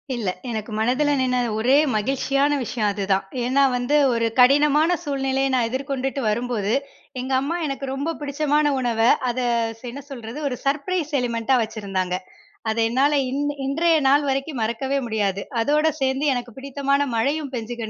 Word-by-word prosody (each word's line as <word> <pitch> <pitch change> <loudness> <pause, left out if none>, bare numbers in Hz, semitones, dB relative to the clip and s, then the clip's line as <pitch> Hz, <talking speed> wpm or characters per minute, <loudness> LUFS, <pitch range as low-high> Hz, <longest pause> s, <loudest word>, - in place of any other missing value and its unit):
இல்ல, 215 -6 -2 0.2
எனக்கு 220 0 -4
மனதுல 255 +7 +1
நின்ன 250 -1 +1 0.2
ஒரே 250 +5 +3 0.2
மகிழ்ச்சியான 275 +5 +1
விஷயம் 225 -3 -1
அதுதான். 195 -1 0 0.2
ஏன்னா, 260 +3 +2
வந்து 245 +4 0 0.2
ஒரு 230 0 +1
கடினமான 295 +6 +5
சூழ்நிலைய 270 -1 0
நான் 235 -2 +2
எதிர்கொண்டுட்டு 270 +1 -3
வரும்போது, 225 -2 -1 0.5
எங்க 260 +1 -3
அம்மா 315 +5 -2
எனக்கு 275 -1 -4
ரொம்ப 295 +5 -2
பிடிச்சமான 295 +1 +1
உணவ, 235 -3 -1 0.3
அத 245 - -2 0.5
என்ன 280 +3 -8
சொல்றது, 235 +1 -7
ஒரு 250 - -2
சர்ப்ரைஸ் 305 +3 -1
எலிமெண்டா 240 +1 0
வச்சிருந்தாங்க. 195 -4 -3 0.5
அத 220 - -2
என்னால 270 +5 +2 0.2
இன் 280 +2 -1 0.2
இன்றைய 325 +4 +2
நாள் 285 +1 +4
வரைக்கும் 270 -1 -2
மறக்கவே 265 +5 -1
முடியாது. 200 -3 -1 0.2
அதோட 300 +4 +2 0.2
சேர்ந்து 265 +2 +1
எனக்கு 245 -1 -4
பிடித்தமான 275 +1 -1 0.2
மழயும் 280 +4 -1
பெஞ்சு 235 0 -4
265 Hz, 145 wpm, -23 LUFS, 230-280 Hz, 0.5 s, கடினமான